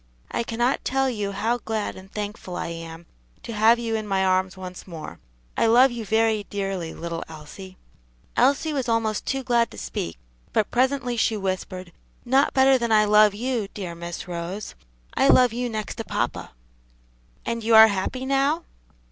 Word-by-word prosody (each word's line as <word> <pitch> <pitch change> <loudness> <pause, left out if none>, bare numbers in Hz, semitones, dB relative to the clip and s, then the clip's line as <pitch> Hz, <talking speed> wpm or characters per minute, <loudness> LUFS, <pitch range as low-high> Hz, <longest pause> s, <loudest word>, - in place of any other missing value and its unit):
I - - -1
cannot 240 +3 0
tell 270 0 +1
you 205 -4 -3
how 220 +5 -1
glad 220 -2 -3
and 190 +1 -13
thankful 205 -3 -5
I - - -3
am 165 0 -8 0.4
to 230 - -6
have 220 +2 +5
you 230 -1 -3
in 215 -1 -3
my 190 -1 +1
arms 185 0 +1
once 185 0 -9
more. 160 - -8 0.4
I - - +2
love 245 +4 +6
you 235 -2 -5
very 220 -1 +1
dearly, 195 -5 -3
little 170 0 -5
Elsie." 160 +5 -11 0.6
Elsie 285 +5 +2
was 265 -4 -2
almost 225 -2 0
too 270 0 -1
glad 240 -2 +2
to - - -13
speak, 65 +6 -4 0.4
but 215 - +1
presently 250 -1 +1
she 220 -1 +1
whispered, 185 -2 -4 0.3
"Not 265 +3 +3
better 265 0 +5
than 235 -1 -1
I 215 -1 +5
love 210 0 +5
you, 235 -2 -2
dear 185 -4 -5
Miss 170 +2 -7
Rose. 175 +4 -5 0.4
I 270 - +3
love 250 -4 +5
you 245 +1 -2
next 215 -2 -4
to 225 - -3
papa." - - -3 0.9
"And 230 -1 -3
you 225 0 +4
are 220 0 +11
very 210 - -1
happy 255 +7 -3
now?" 275 +5 +1
215 Hz, 180 wpm, -24 LUFS, 190-240 Hz, 0.9 s, are